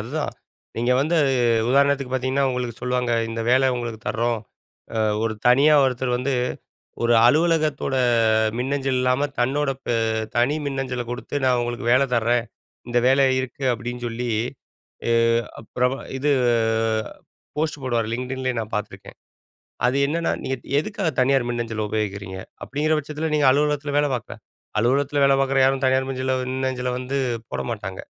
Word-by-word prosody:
அதுதான் 145 +7 -3 0.4
நீங்க 120 +2 +1
வந்து 155 +5 0
அது 140 -2 +2 0.4
உதாரணத்துக்கு 140 0 +2
பார்த்தீங்கன்னா, 130 +2 0
உங்களுக்கு 125 -2 -3
சொல்லுவாங்க 125 0 0 0.2
இந்த 115 0 -4
வேலை 130 +1 +4
உங்களுக்கு 120 -2 -5
தர்றோம். 115 0 0 0.6
அ - - 0 0.3
ஒரு 110 -1 -1
தனியா 140 +5 +6
ஒருத்தர் 130 -1 -1
வந்து 130 +3 -1 0.7
ஒரு 120 0 +3
அலுவலகத்தோட 155 -1 +2 0.6
மின்னஞ்சல் 135 +1 -1
இல்லாமல் 130 +3 0
தன்னோட 135 +3 +1 0.2
பெ 120 - 0 0.4
தனி 125 +6 +2
மின்னஞ்சலை 135 -3 -3
குடுத்து, 125 +3 -6
நான் 125 -1 +3
உங்களுக்கு 120 0 -4
வேலை 135 +2 +4
தர்றேன். 115 +1 +2 0.4
இந்த 120 0 +2
வேலை 135 +1 +5 0.2
இருக்கு 130 +1 -6
அப்டின்னு 120 +2 -6
சொல்லி, 120 +1 -3 0.8
எ - - +4 0.5
அப் 115 - -17
பிரெப 125 +1 +2 0.3
இது 145 +3 +1 1.3
போஸ்ட் 155 -1 -2
போடுவார் 120 -3 0
LinkedInலயே 130 +1 -3
நான் 110 0 -7
பார்த்துருக்கேன். 105 -1 -7 0.7
அது 125 +2 +1
என்னன்னா 165 +3 -1
நீ - - -5 0.2
நீங்க 140 - -1
எதுக்காக 195 +1 -3
தனியார் 130 -1 +3
மின்னஞ்சலை 115 -2 -3
உபயோகிக்கிறீங்க? 100 -3 -3 0.3
அப்படிங்கிற 150 +3 0
பட்சத்தில 150 +2 -4
நீங்க 150 -2 +3
அலுவலகத்தில 145 0 0
வேலை 145 -1 +1
பார்க்குற, 120 - -6 0.4
அலுவலகத்தில் 140 +4 +1
வேலை 140 0 +5
பார்க்குற 135 0 +2
யாரும் 135 0 +2
தனியார் 130 0 +2
மஞ்சல 130 0 -1 0.2
மின்னஞ்சலை 130 -1 -2
வந்து 130 +2 -2 0.3
போட 65 - -2
மாட்டாங்க. - - -6
130 Hz, 145 wpm, -23 LUFS, 120-140 Hz, 1.3 s, தனியா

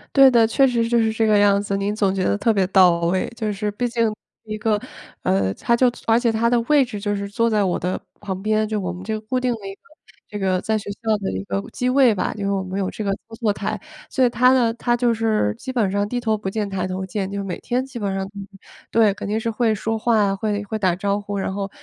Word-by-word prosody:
对 270 -1 +8
的， 230 -2 +5
确 270 +4 +4
实 235 -2 +1
就 235 - +2
是 220 -1 +2
这 225 0 0
个 210 -1 +4
样 200 0 +4
子， 200 -1 -2
您 200 +1 -1
总 200 -3 +1
结 190 -1 -1
得 205 - +1
特 225 +2 +2
别 195 -2 +2
到 180 -3 +5
位。 175 +2 +1
就 220 -2 -2
是 210 +1 -2
毕 245 +4 -2
竟 230 -2 +1 0.3
一 215 0 -5
个， 215 0 +1 0.4
呃， 95 0 +1
她 235 - +1
就 245 +1 +3 0.2
而 225 +1 +5
且 235 -2 +2
她 230 +1 +1
的 240 -1 +3
位 285 +3 +4
置 225 -5 -6
就 205 0 -1
是 200 0 -4
坐 230 +3 +1
在 210 -2 +2
我 180 -2 0
的 180 +2 -2 0.2
旁 190 -2 -5
边， 215 +1 +1
就 215 -1 -2
我 180 -2 -3
们 180 +1 -8
这 220 - -3
个 215 - -3
固 255 +4 -2
定 250 -1 0
的 205 -4 -8
一 195 - -6
个 - - -56 0.5
这 210 - -5
个 185 -1 +1
在 220 0 0
学 205 - -7
校 220 +1 -1
的 200 - -3
一 95 +1 -4
个 100 0 -2
机 250 0 -1
位 255 -3 +5
吧， - - -1
就 210 - -8
因 200 - -1
为 - - 0
我 195 -1 -1
们 190 +1 -4
有 190 - -1
这 215 - -6
个 200 - 0
操 225 +3 -10
作 220 -3 +2
台。 205 +2 -3 0.3
所 265 - +1
以 - - +3
她 250 +2 +4
呢 240 -3 +3
她 240 +1 0
就 240 -1 +2
是 220 - +1
基 260 - -6
本 220 -7 +1
上 205 +1 0
低 245 +3 -2
头 220 -3 0
不 195 -2 -4
见 210 0 -2
抬 190 -1 -2
头 190 +1 -4
见， 190 0 -3
就 200 0 -4
每 185 -2 -5
天 250 +1 -1
基 255 -3 -8
本 195 -2 -2
上 195 - -2
嗯 - - -13 0.2
嗯， 195 - -15 0.3
对， 220 -3 +4
肯 200 - -7
定 215 +2 0
是 230 +1 -2
会 225 -1 +1
说 225 +2 -2
话 230 -1 +2
呀， 195 -1 +1
会 205 0 -2
会 215 +2 -4
打 185 -4 +2
招 200 +2 -1
呼， 205 0 -5
然 195 - -2
后， 200 0 -3
210 Hz, 310 characters per minute, -22 LUFS, 195-230 Hz, 0.5 s, 对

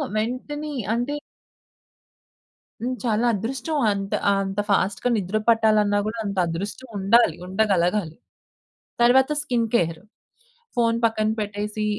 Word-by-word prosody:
వెంటనే 255 +7 -3 0.2
అంటే 245 +5 -1 1.7
హ్మ్. 255 +2 -2
చాలా 225 0 +1
అదృష్టం. 255 +9 -3
అంత 195 -1 -3 0.3
అంత 195 +1 -3
ఫాస్ట్‌గా 200 +4 +1
నిద్ర 200 +1 -1
పట్టాలన్నా 215 -2 +3
గూడా 225 +2 -4
అంత 200 -1 -4
అదృష్టం 200 +10 -5
ఉండాలి. 200 -2 +4
ఉండగలగాలి. 185 -3 +1 0.9
తర్వాత 260 +4 +5
స్కిన్ 240 -5 0
కేర్. 165 -6 0 0.7
ఫోను 230 -1 +2
పక్కన 215 -1 +1
పెట్టేసి 210 +1 -3
215 Hz, 105 wpm, -23 LUFS, 200-240 Hz, 1.7 s, తర్వాత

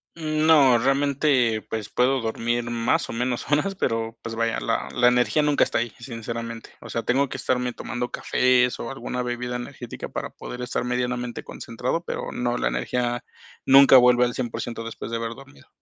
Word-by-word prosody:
No, 155 -5 +4
realmente, 135 -3 +2
pues, 110 -2 -4
puedo 130 +2 +2
dormir 115 +1 -1
más 115 -1 +1
o - - -6
menos 120 +1 -2
horas, 195 +7 +1
pero, 115 -8 -2
pues 115 - -5
vaya, 115 0 0
la - - -1
la 120 0 +3
energía 125 +5 +2
nunca 150 -1 +3
está - - -1
ahí, 120 -1 -1
sinceramente. 115 -1 -6
O - - -10
sea, 115 - -2
tengo 135 +2 +1
que - - -5
estarme 125 -1 -1
tomando 125 0 -4
cafés, 125 -1 +2
o 120 - -5
alguna 125 -2 -4
bebida 125 0 -3
energética 120 - -7
para - - -5
poder 125 0 -8
estar 125 - -2
medianamente 125 -1 -2
concentrado, 125 +8 -4
pero - - -5
no, 120 0 -1
la - - 0
energía 120 - -2 0.4
nunca 135 0 +8
vuelve 125 0 +6
al 120 - -2
100% 115 -2 -4
después 115 0 -7
de 115 - -1
haber 115 0 -4
dormido. 70 0 -16
125 Hz, 180 wpm, -24 LUFS, 115-130 Hz, 0.4 s, nunca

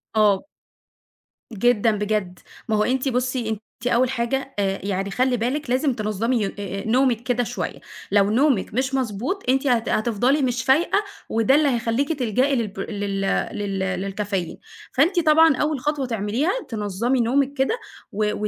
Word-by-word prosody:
آه. 210 -1 +3 1.1
جدًا 225 +1 +3
بجد، 210 -3 -2 0.3
ما 220 - +2
هو 210 - +3
أنتِ 260 +3 0
بُصّي، 250 -2 -1
أنتِ 220 -1 -3 0.3
أول 250 +1 +3
حاجة 265 +2 -2
آآ، 195 -1 0
يعني 195 0 -2
خلّي 250 +3 +1
بالِك 255 +5 -2
لازم 260 +2 +2
تنظمي 220 +2 -1
يون 195 - -1
آآ، 195 -1 -4
آآ، - - -7
نومِك 245 -1 +2
كده 245 0 0
شوية، - - -4 0.3
لو 200 0 +4
نومِك 255 -5 +2
مش 260 +3 -1
مضبوط 255 - -2
أنتِ 270 +2 +2
هت 235 -3 +2
هتفضلي 240 +6 +1
مش 250 -1 0
فايقة، 330 +9 +3 0.3
وده 230 +4 +3
اللي 300 0 +4
هيخلّيكِ 240 +4 0
تلجئي 255 +4 +1
للبر 205 -5 -3
لل 200 -1 -2 0.4
لل 200 -2 -3 0.2
للكافيين، 195 -3 -3 0.4
فأنتِ 345 +7 +3
طبعًا 320 -1 +5
أول 300 -1 0
خطوة 290 0 -1
تعمليها 230 - -1 0.2
تنظّمي 225 +3 -1
نومِك 270 +4 +1
كده، 285 - 0 0.3
و 210 +1 0
240 Hz, 155 wpm, -23 LUFS, 210-265 Hz, 1.1 s, طبعًا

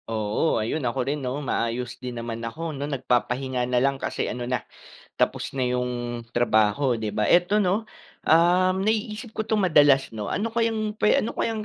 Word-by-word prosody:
Oo, 110 +7 0
ayun, 115 +8 -1
ako 125 0 -1
rin, 145 +1 -2
'no, 130 +1 -3
maayos 120 0 -2
din 125 -1 -5
naman 115 -1 -5
ako, 155 +8 -5
'no, 145 +1 -4
nagpapahinga 125 -1 -1
na 125 - +1
lang 135 +2 +1
kasi - - -2
ano 125 0 -4
na, 125 -4 -1 0.5
tapos 140 - -1
na 130 - +1
yung 125 -1 -2 0.2
trabaho, 115 +2 +2
di 110 - -2
ba 105 +1 -1
eto, 175 - +4
'no, 210 +2 +1 0.4
um, 180 +3 +4
naiisip 215 +1 -2
ko - - -4
ito 220 - +2
madalas, 145 - +4
'no? 105 -2 -5
Ano 225 +2 -2
kayang 220 -2 -1
pwe 210 - +3
ano 230 - -3
kayang 220 -2 -2
135 Hz, 180 wpm, -25 LUFS, 120-185 Hz, 0.5 s, eto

